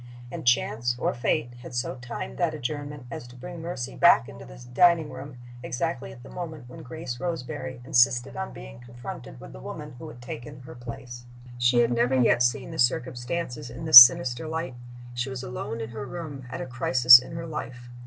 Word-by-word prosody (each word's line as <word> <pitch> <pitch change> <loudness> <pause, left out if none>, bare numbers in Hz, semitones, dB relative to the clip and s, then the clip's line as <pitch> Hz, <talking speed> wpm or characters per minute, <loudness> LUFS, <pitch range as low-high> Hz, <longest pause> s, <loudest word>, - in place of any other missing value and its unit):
And - - -7
Chance, 120 -1 +1
or - - -1
Fate, 120 0 -1
had 125 - -10
so 120 - -2
timed 125 -1 -8
that 170 -3 0
adjournment 145 0 -6
as 120 - -7
to 120 - -15
bring 165 +7 -9
Mercy 145 -7 -5
back 60 - +5
into - - -11
the - - -13 0.2
dining 170 -1 +4
room 130 0 -9 0.2
exactly 130 +3 -4
at 120 - -14
the - - -12
moment 160 -7 -7
when 125 - -11
Grace 125 -3 -7
Roseberry 130 -5 -5
insisted 125 +1 +2
on 190 0 -5
being 115 +1 -11
confronted 120 - -10
with - - -12
the 60 - -11
woman - - -8
who 160 - -9
had 125 - -12
taken 125 +3 -9
her 130 - -11
place. 120 0 -10 0.3
She 120 0 +4
had 120 0 +1
never 120 +2 +1
yet 120 -1 +3
seen 125 +2 0
the - - -8
circumstances 125 +2 -1
in 125 +7 -8
this 140 -6 +13
sinister 120 +3 +4
light. 160 -3 -4 0.4
She 120 +2 -3
was 130 -1 -6
alone 125 -2 -6
in 115 +1 -6
her 135 +4 -7
room, 145 -7 -8
at 130 - -6
a - - -4
crisis 125 0 +7
in 125 - -11
her 165 0 -6
life. 125 -6 -7
125 Hz, 200 wpm, -26 LUFS, 120-145 Hz, 0.4 s, this